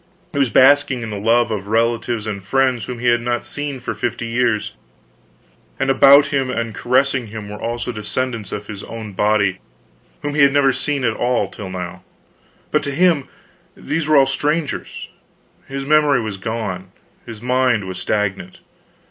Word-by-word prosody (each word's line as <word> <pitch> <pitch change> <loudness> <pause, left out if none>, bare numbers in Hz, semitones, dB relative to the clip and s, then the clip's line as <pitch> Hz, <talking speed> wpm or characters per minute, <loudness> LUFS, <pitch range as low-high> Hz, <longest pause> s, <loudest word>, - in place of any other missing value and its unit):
He 145 - -1
was 135 -3 +3
basking 130 +1 +4
in 115 - -5
the 105 - -4
love 115 +2 +2
of 100 -2 -3
relatives 115 0 0
and 100 -3 -5
friends 130 +1 +1
whom 125 - -6
he 120 +1 +1
had 120 0 +3
not 120 0 -2
seen 145 -2 -3
for 120 -2 -4
fifty 115 +2 -3
years; 115 -2 0 1.1
and 135 0 +2
about 140 +1 +6
him 135 -2 +1
and 115 -3 -2
caressing 125 +1 +1
him 105 -1 -8
were 105 - -8
also 120 +1 -3
descendants 115 0 -3
of 105 - -5
his 100 -1 -8
own 110 -2 -8
body 100 -1 +1 0.6
whom 145 0 -2
he 150 - +2
had 140 -1 +5
never 140 -2 +4
seen 145 -1 -2
at 115 -2 +2
all 120 -3 0
till 100 -2 -8
now; 90 0 -6 0.7
but - - +2
to 140 - -3
him 165 -1 +2 0.5
these 155 0 -2
were 155 -1 +5
all 135 - +6
strangers, 145 +3 -2 0.6
his 135 0 -5
memory 150 -2 +4
was 110 -4 -4
gone, 95 -3 -4 0.4
his 115 -2 -8
mind 125 -3 +1
was 95 0 -6
stagnant. 100 -2 -2
120 Hz, 175 wpm, -19 LUFS, 105-135 Hz, 1.1 s, about